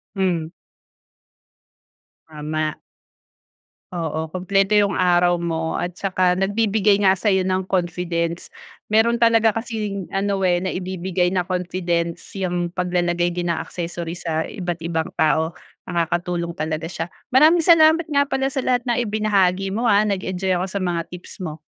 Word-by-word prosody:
Hmm. 175 -4 -1 1.8
Tama. 155 0 -3 1.2
Oo, 160 -2 -3
kumpleto 195 +2 +1
'yung 200 -1 +2
araw 175 -1 +3
mo 165 -1 -2
at 175 0 -3
saka 185 -2 +2
nagbibigay 205 0 +2
nga 190 -1 +6
sa'yo 190 -3 +2
ng 185 0 -1
confidence. 170 -2 -1 0.4
Meron 225 +2 +3
talaga 230 -1 +5
kasing 210 -4 -4
ano, 195 0 0
eh, 175 -1 +3
naibibigay 185 -1 -1
na 180 -1 +1
confidence 175 -2 -2
'yang 175 -2 -2
paglalagay 175 -1 0
din 175 -1 -1
ng 165 - -1
accessories 170 0 -5
sa 160 -1 -1
iba't 175 -5 -4
ibang 165 -1 -2
tao, 160 +1 +2 0.3
nakakatulong 175 0 -2
talaga 155 +1 -3
siya. 165 -2 -4 0.3
Maraming 315 +5 +6
salamat 325 -1 +6
nga 285 -2 +3
pala 270 -1 -1
sa 265 -1 -3
lahat 250 -1 +2
na 240 - +2
ibinahagi 200 -4 +1
mo, 230 +3 -2
ah, 205 0 +5
nag-enjoy 190 -1 -1
ako 180 - -1
sa 200 - -3
mga 175 -2 0
tips 180 0 -10
mo. 155 -2 -6
180 Hz, 140 wpm, -21 LUFS, 170-200 Hz, 1.8 s, nga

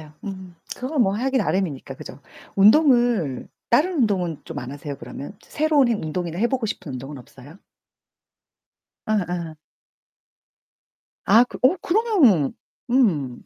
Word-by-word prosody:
맞아요. 150 -1 -14
음 190 -3 -8 0.2
그건 260 +1 0
뭐 195 -1 +1
하기 260 +4 0
나름이니까 175 - -2
그죠. 140 - -11 0.4
운동을 230 - +4 0.2
다른 335 +10 +3
운동은 185 - 0
좀 165 -4 -7
안 125 0 -6
하세요 145 0 -7
그러면? 145 +10 -9
새로운 300 -4 +2
해 235 - +2
운동이나 170 -1 -4
해 235 - +3
보고 255 -4 -1
싶은 150 -8 -6
운동은 135 +2 -7
없어요? 135 +6 -15 1.5
어어. 175 -6 -2 1.7
아 225 +5 +6
그 - - -9
어 265 +8 +5
그러면 340 - +3 0.4
음. 160 - +1
195 Hz, 270 characters per minute, -22 LUFS, 150-250 Hz, 1.7 s, 아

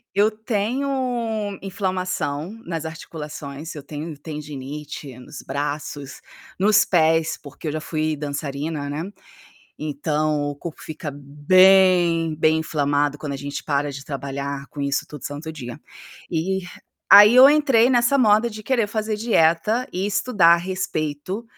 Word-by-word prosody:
Eu 210 +2 +4
tenho 225 -1 -2
inflamação 185 -5 -3
nas 165 -2 -4
articulações, 155 -2 -7
eu 145 - -8
tenho 150 +2 -7
tendinite 145 -2 -7
nos 125 - -10
braços, 145 -1 -4 0.4
nos 215 +3 +4
pés, 160 -2 +2
porque 145 +2 -9
eu - - -2
já 155 - -3
fui 155 -1 -2
dançarina, 145 0 -4
né, 150 +3 -3 0.8
então 150 0 -1
o 145 -1 -4
corpo 165 +1 -8
fica 155 -1 -6
bem, 170 +3 +4
bem 155 +1 +3
inflamado 145 -2 0
quando 150 -2 -5
a - - -3
gente 140 +1 -5
para 145 -1 -1
de 135 - -8
trabalhar 140 0 -5
com 145 - -8
isso 140 0 0
todo 150 -3 -10
santo 150 +3 -6
dia. 120 -6 -8 0.5
E 185 +4 -1 0.5
aí 205 +3 +10
eu 260 +2 +10
entrei 270 -5 +4
nessa 245 +2 +3
moda 220 -1 +4
de 215 0 -9
querer 235 -1 +1
fazer 215 0 -2
dieta 210 +2 +2
e 185 +2 -1
estudar 200 -5 +4
a - - +2
respeito 175 +1 -3
160 Hz, 140 wpm, -22 LUFS, 145-200 Hz, 0.8 s, aí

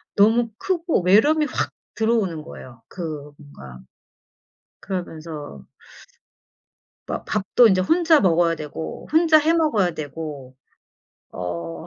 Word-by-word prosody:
너무 225 +3 +4
크고 345 - 0
외로움이 255 - +4
확 - - -2 0.2
들어오는 215 -9 0
거예요, 120 -6 -12
그 155 -5 -7
뭔가. 65 - -13 1.0
그러면서 160 - -7 1.4
막 - - -5
밥도 215 +3 +3
인제 185 -2 +3
혼자 325 - +4
먹어야 170 -3 +3
되고 155 +1 -7
혼자 320 -1 +5
해 310 +2 +2
먹어야 220 - +1
되고. 145 -4 -7 0.8
어, 85 -2 -6
175 Hz, 225 characters per minute, -22 LUFS, 150-235 Hz, 1.4 s, 혼자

